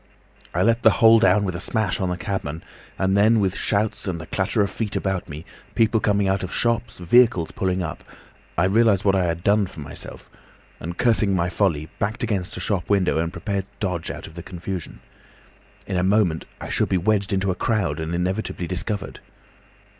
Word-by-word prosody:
I 90 Hz, -, +1 dB
let 115 Hz, +2 st, +3 dB
the 110 Hz, -, +7 dB
whole 115 Hz, 0 st, +7 dB
down 100 Hz, 0 st, +4 dB
with 95 Hz, -2 st, -3 dB
a -, -, -4 dB
smash 105 Hz, 0 st, 0 dB
on 95 Hz, -, 0 dB
the 90 Hz, -, -2 dB
cabman, 90 Hz, -5 st, -4 dB, 0.3 s
and 95 Hz, +1 st, +1 dB
then, 110 Hz, +3 st, +5 dB
with 95 Hz, -2 st, 0 dB
shouts 105 Hz, 0 st, -1 dB
and 85 Hz, -3 st, -2 dB
the 80 Hz, -, -7 dB
clatter 105 Hz, -, 0 dB
of 100 Hz, -, -2 dB
feet 105 Hz, -1 st, -3 dB
about 95 Hz, -3 st, -2 dB
me, 75 Hz, +2 st, -8 dB, 0.3 s
people 110 Hz, 0 st, +3 dB
coming 100 Hz, -2 st, +1 dB
out 95 Hz, 0 st, +1 dB
of 95 Hz, -, -5 dB
shops, 120 Hz, 0 st, 0 dB
vehicles 95 Hz, -1 st, +3 dB
pulling 95 Hz, -1 st, -1 dB
up, 80 Hz, -, -6 dB, 0.5 s
I 80 Hz, -, +3 dB
realised 105 Hz, 0 st, +3 dB
what 95 Hz, -, +4 dB
I 95 Hz, -2 st, +2 dB
had 85 Hz, 0 st, -2 dB
done 100 Hz, -1 st, +3 dB
for 85 Hz, -, -12 dB
myself, 70 Hz, -, -7 dB, 0.5 s
and 85 Hz, +2 st, -6 dB
cursing 110 Hz, -5 st, +3 dB
my 85 Hz, 0 st, +1 dB
folly, 85 Hz, -6 st, 0 dB
backed 110 Hz, +4 st, -2 dB
against 100 Hz, -6 st, -2 dB
a -, -, -4 dB
shop 95 Hz, -2 st, -2 dB
window 95 Hz, -5 st, +2 dB
and 85 Hz, 0 st, -1 dB
prepared 100 Hz, -1 st, -3 dB
to -, -, -31 dB
dodge 90 Hz, -5 st, -2 dB
out -, -, -6 dB
of -, -, -12 dB
the 85 Hz, -, -7 dB
confusion. 90 Hz, 0 st, -6 dB, 0.8 s
In 95 Hz, -, -2 dB
a 90 Hz, -, +1 dB
moment 95 Hz, -4 st, +2 dB
I -, -, -7 dB
should -, -, +1 dB
be 95 Hz, -, +2 dB
wedged 100 Hz, +2 st, +1 dB
into 95 Hz, 0 st, +1 dB
a -, -, 0 dB
crowd 95 Hz, -8 st, 0 dB
and 80 Hz, +2 st, -3 dB
inevitably 90 Hz, +1 st, -2 dB
discovered. 95 Hz, +3 st, -3 dB
95 Hz, 205 wpm, -23 LUFS, 90-105 Hz, 0.8 s, the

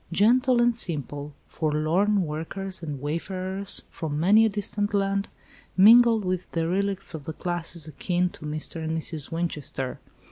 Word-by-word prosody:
"Gentle 240 Hz, +7 st, +3 dB
and 240 Hz, 0 st, +3 dB
simple," 145 Hz, -, -2 dB
forlorn 165 Hz, +7 st, +1 dB
workers 170 Hz, +5 st, -5 dB
and 150 Hz, -4 st, -5 dB
wayfarers 185 Hz, +6 st, 0 dB
from 150 Hz, -2 st, -4 dB
many 210 Hz, +7 st, +5 dB
a -, -, 0 dB
distant 205 Hz, 0 st, -2 dB
land, 195 Hz, 0 st, 0 dB, 0.5 s
mingled 225 Hz, +1 st, +7 dB
with 185 Hz, 0 st, -3 dB
derelicts 190 Hz, +3 st, -1 dB
of 155 Hz, -3 st, -7 dB
the 160 Hz, -, -5 dB
classes 170 Hz, -1 st, -3 dB
akin 180 Hz, +3 st, -1 dB
to -, -, -14 dB
"Mr. 155 Hz, +2 st, -3 dB
and 160 Hz, +1 st, -2 dB
Mrs. 160 Hz, -2 st, -3 dB
Winchester." 150 Hz, -6 st, -4 dB
180 Hz, 140 wpm, -25 LUFS, 155-200 Hz, 0.5 s, mingled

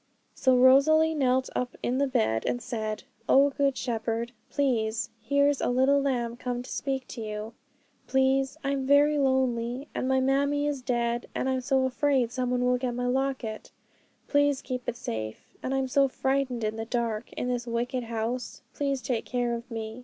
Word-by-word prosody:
So 260 Hz, -1 st, +3 dB
Rosalie 295 Hz, +5 st, +6 dB
knelt 260 Hz, -3 st, +1 dB
up 250 Hz, 0 st, -2 dB
in 250 Hz, +2 st, 0 dB
bed, 110 Hz, -, +1 dB
and 245 Hz, -, 0 dB
said, 215 Hz, -3 st, -4 dB, 0.3 s
'O 280 Hz, +1 st, +6 dB
Good 275 Hz, -1 st, +1 dB
Shepherd, 230 Hz, -1 st, -2 dB, 0.2 s
plase, 230 Hz, -6 st, 0 dB
here's 280 Hz, +4 st, +2 dB
a -, -, +1 dB
little 265 Hz, +3 st, +3 dB
lamb 240 Hz, -4 st, -1 dB
come 245 Hz, 0 st, -3 dB
to -, -, -10 dB
speak 270 Hz, -2 st, -2 dB
to 235 Hz, -, -7 dB
you. 215 Hz, +1 st, -5 dB, 0.5 s
Please 265 Hz, +1 st, +2 dB
I'm 275 Hz, -1 st, -1 dB
very 290 Hz, +1 st, +5 dB
lonely, 260 Hz, 0 st, 0 dB
and -, -, -2 dB
my 265 Hz, 0 st, +3 dB
mammie 280 Hz, +2 st, +1 dB
is 290 Hz, -3 st, -1 dB
dead, 240 Hz, -1 st, -1 dB
and -, -, -1 dB
I'm 260 Hz, -1 st, 0 dB
so 265 Hz, 0 st, +2 dB
afraid 260 Hz, -2 st, +1 dB
someone 250 Hz, 0 st, 0 dB
will 250 Hz, 0 st, +2 dB
get 245 Hz, -1 st, -2 dB
my 245 Hz, 0 st, -2 dB
locket; 255 Hz, -3 st, -2 dB, 0.6 s
please 285 Hz, -1 st, +2 dB
keep 250 Hz, -2 st, -4 dB
it 235 Hz, -, -4 dB
safe. 110 Hz, -, -6 dB
And 260 Hz, -, -3 dB
I'm 270 Hz, -1 st, 0 dB
so 275 Hz, +2 st, +3 dB
frightened 265 Hz, -2 st, -1 dB
in 215 Hz, +1 st, -1 dB
the 225 Hz, -, -3 dB
dark 230 Hz, -2 st, -2 dB
in -, -, -3 dB
this 245 Hz, -1 st, -2 dB
wicked 240 Hz, +2 st, -2 dB
house; 230 Hz, +2 st, -4 dB
please 275 Hz, -3 st, -1 dB
take 240 Hz, -3 st, -1 dB
care 245 Hz, -1 st, -1 dB
of 235 Hz, +1 st, -6 dB
me. 225 Hz, 0 st, -5 dB
255 Hz, 175 wpm, -27 LUFS, 235-270 Hz, 0.6 s, Rosalie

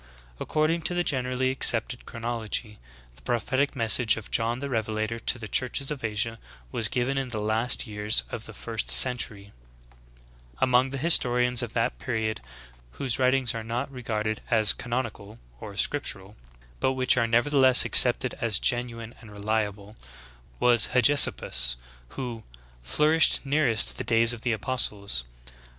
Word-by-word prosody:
According 155 Hz, +2 st, -1 dB
to 175 Hz, -, -5 dB
the 175 Hz, -, 0 dB
generally 130 Hz, -3 st, -2 dB
accepted 120 Hz, -1 st, 0 dB
chron 115 Hz, -, -10 dB
ology, 110 Hz, -2 st, -4 dB, 0.4 s
the 65 Hz, -, -19 dB
prophetic 130 Hz, -, -2 dB
message 115 Hz, -2 st, +2 dB
of 110 Hz, -, -10 dB
John 115 Hz, +1 st, 0 dB
the 140 Hz, +2 st, -6 dB
Revelator 110 Hz, -2 st, -3 dB
to 120 Hz, -, 0 dB
the 110 Hz, -2 st, -9 dB
churches 130 Hz, +6 st, -1 dB
of 140 Hz, -4 st, -7 dB
Asia 110 Hz, +1 st, -3 dB, 0.3 s
was 115 Hz, -, 0 dB
given 130 Hz, +2 st, -2 dB
in 135 Hz, -, -4 dB
the 115 Hz, -3 st, -5 dB
last 110 Hz, +5 st, +1 dB
years 105 Hz, -, +1 dB
of -, -, -6 dB
the -, -, -10 dB
first 60 Hz, -, -5 dB
17 65 Hz, -, +7 dB
J 100 Hz, -1 st, -16 dB, 1.1 s
Among 130 Hz, +1 st, +2 dB
the 135 Hz, -, -6 dB
historians 125 Hz, -5 st, +2 dB
of 120 Hz, -2 st, -6 dB
that 115 Hz, -1 st, -2 dB
period 110 Hz, -3 st, -4 dB, 0.5 s
whose 130 Hz, -2 st, -3 dB
writings 130 Hz, -1 st, +1 dB
are 115 Hz, -1 st, -6 dB
not 115 Hz, +4 st, -5 dB
regarded 110 Hz, -4 st, -4 dB
as 110 Hz, -2 st, +2 dB
canonical 115 Hz, -4 st, -6 dB, 0.2 s
or 100 Hz, +6 st, -10 dB
scriptural, 105 Hz, -9 st, -2 dB, 0.4 s
but 130 Hz, -, 0 dB
which 130 Hz, -1 st, +1 dB
are 120 Hz, -2 st, 0 dB
nevertheless 130 Hz, +2 st, +4 dB
accepted 125 Hz, 0 st, +4 dB
as 115 Hz, -4 st, 0 dB
genuine 120 Hz, -2 st, -2 dB
and 115 Hz, -, -14 dB
reliable, 105 Hz, 0 st, -4 dB, 0.6 s
was 120 Hz, -2 st, +3 dB
Hegesip 140 Hz, +3 st, +6 dB
pus, -, -, 0 dB, 0.4 s
who, 120 Hz, -4 st, -6 dB, 0.4 s
"flourished 150 Hz, -, +3 dB
nearest 135 Hz, -5 st, +2 dB
the -, -, -3 dB
days 115 Hz, 0 st, +3 dB
of 115 Hz, -, -9 dB
the 120 Hz, -, -2 dB
apostles." 105 Hz, -, -3 dB
120 Hz, 150 wpm, -25 LUFS, 110-130 Hz, 1.1 s, 17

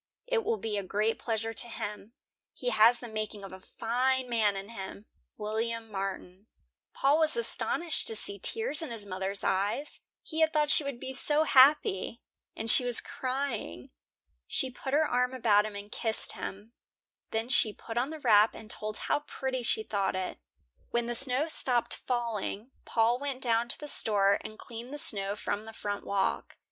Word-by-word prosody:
It -, -, 0 dB
will 445 Hz, +2 st, 0 dB
be 220 Hz, -, -3 dB
a -, -, -4 dB
great 210 Hz, +4 st, 0 dB
pleasure 225 Hz, -1 st, -2 dB
to 240 Hz, -, +2 dB
him. 210 Hz, -1 st, -6 dB, 0.4 s
He 245 Hz, -1 st, -1 dB
has 225 Hz, +2 st, +6 dB
the 240 Hz, -, -8 dB
making 215 Hz, -2 st, -5 dB
of 195 Hz, -, -8 dB
a 190 Hz, -, -9 dB
fine 255 Hz, +6 st, 0 dB
man 220 Hz, -4 st, +2 dB
in 195 Hz, +2 st, -6 dB
him. 200 Hz, -1 st, -8 dB, 0.3 s
WILLIAM 225 Hz, +1 st, -3 dB
MARTIN." 195 Hz, 0 st, -5 dB, 0.4 s
Paul 285 Hz, +3 st, +3 dB
was 315 Hz, +6 st, +3 dB
astonished 345 Hz, -7 st, 0 dB
to 225 Hz, -, 0 dB
see 200 Hz, -1 st, -1 dB
tears 445 Hz, -, +1 dB
in 320 Hz, -, -4 dB
his 225 Hz, -3 st, -4 dB
mothers 190 Hz, 0 st, -2 dB
eyes; 200 Hz, +10 st, -1 dB, 0.2 s
he 320 Hz, -, -5 dB
had 320 Hz, 0 st, +4 dB
thought 300 Hz, -1 st, +2 dB
she 305 Hz, -, +4 dB
would 280 Hz, -4 st, -5 dB
be 265 Hz, -, -6 dB
so 295 Hz, +3 st, +4 dB
happy, 260 Hz, -7 st, +4 dB, 0.3 s
and 225 Hz, -, -5 dB
she 250 Hz, -, +6 dB
was 245 Hz, -1 st, +3 dB
crying. 260 Hz, -, -4 dB, 0.6 s
She 260 Hz, -, +1 dB
put 265 Hz, +2 st, -6 dB
her 310 Hz, +1 st, +4 dB
arm 250 Hz, -1 st, 0 dB
about 215 Hz, -4 st, +4 dB
him 210 Hz, -, -9 dB
and 200 Hz, +1 st, -8 dB
kissed 225 Hz, -2 st, 0 dB
him. 205 Hz, +4 st, -7 dB, 0.6 s
Then 225 Hz, +1 st, -2 dB
she 250 Hz, -4 st, +3 dB
put 225 Hz, +2 st, -9 dB
on 245 Hz, +4 st, 0 dB
the 315 Hz, 0 st, -7 dB
wrap 220 Hz, -5 st, +5 dB
and 215 Hz, -1 st, -8 dB
told 215 Hz, 0 st, -1 dB
how -, -, 0 dB
pretty 260 Hz, -1 st, -3 dB
she 225 Hz, -2 st, +1 dB
thought 200 Hz, -3 st, -1 dB
it. 185 Hz, -, -4 dB, 0.5 s
When 235 Hz, 0 st, 0 dB
the 240 Hz, -, -2 dB
snow 265 Hz, +4 st, +2 dB
stopped 250 Hz, -6 st, +1 dB
falling, 235 Hz, -1 st, -3 dB
Paul 230 Hz, +2 st, +2 dB
went 275 Hz, -2 st, -4 dB
down 235 Hz, -1 st, +1 dB
to -, -, -1 dB
the 295 Hz, -, -7 dB
store 200 Hz, -6 st, +3 dB
and 215 Hz, -, -8 dB
cleaned 235 Hz, +2 st, -9 dB
the 295 Hz, -, -5 dB
snow 200 Hz, -7 st, 0 dB
from 210 Hz, 0 st, -3 dB
the 225 Hz, -, -9 dB
front 205 Hz, -1 st, -4 dB
walk. 200 Hz, -1 st, -1 dB
230 Hz, 185 wpm, -30 LUFS, 210-260 Hz, 0.6 s, has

